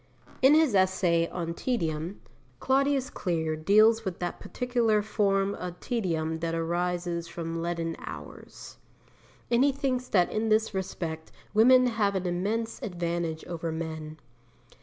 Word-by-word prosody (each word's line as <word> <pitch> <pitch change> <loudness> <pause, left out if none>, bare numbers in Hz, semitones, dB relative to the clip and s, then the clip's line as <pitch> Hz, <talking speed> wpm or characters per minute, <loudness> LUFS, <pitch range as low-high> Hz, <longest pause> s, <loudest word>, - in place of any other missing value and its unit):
In 270 +3 +7
his 315 -6 +4
essay 185 -3 +3
on 170 -2 -4
Tedium, 170 -5 -2 0.4
Claudius 275 0 +1
Clear 160 -4 -1
deals 215 +7 +4
with 190 -4 -4
that 175 -1 -4
particular 235 -4 0
form 200 -2 +1
of 180 -2 -6
tedium 160 -8 -2
that 165 0 -2
arises 175 0 -2
from 165 0 -4
leaden 165 -1 -2
hours. - - -10 0.7
And 240 +2 +4
he 285 - +4
thinks 260 -2 -2
that 180 -3 +2
in 220 +1 -1
this 215 0 +2
respect 170 -4 -4 0.2
women 255 +4 +6
have 215 -4 +1
an 190 -1 -1
immense 205 +6 -2
advantage 170 -3 -3
over 165 -1 -4
men. 160 -1 -5
185 Hz, 135 wpm, -28 LUFS, 165-225 Hz, 0.7 s, In